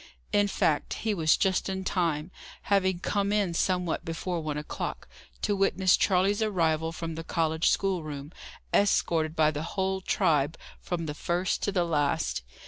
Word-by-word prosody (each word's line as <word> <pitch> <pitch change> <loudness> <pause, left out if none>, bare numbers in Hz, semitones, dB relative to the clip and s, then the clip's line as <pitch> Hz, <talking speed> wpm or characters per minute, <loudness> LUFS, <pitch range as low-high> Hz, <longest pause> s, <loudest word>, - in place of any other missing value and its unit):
In 205 0 +4
fact, 155 -6 0
he 220 - +2
was 160 -4 +3
just 190 0 +1
in 190 0 -3
time, 170 -3 -1 0.4
having 190 -2 +3
come 200 -1 0
in 205 -4 +1
somewhat 180 -1 0
before 170 +1 -3
one 150 -2 -3
o'clock, 150 - -5 0.4
to 205 - +1
witness 190 -1 +3
Charley's 195 +2 +2
arrival 165 -6 +1
from 165 0 -5
the 165 +1 -6
college 160 -1 +1
schoolroom, 155 -6 -2 0.4
escorted 165 -5 +2
by 155 -1 +4
the 150 -1 -4 0.2
whole 190 0 0
tribe, 150 -4 +1 0.2
from 175 -2 -3
the 150 - -3
first 175 +4 -1
to 200 - 0
the 180 -3 +1
last. 150 - 0
170 Hz, 155 wpm, -28 LUFS, 160-190 Hz, 0.4 s, In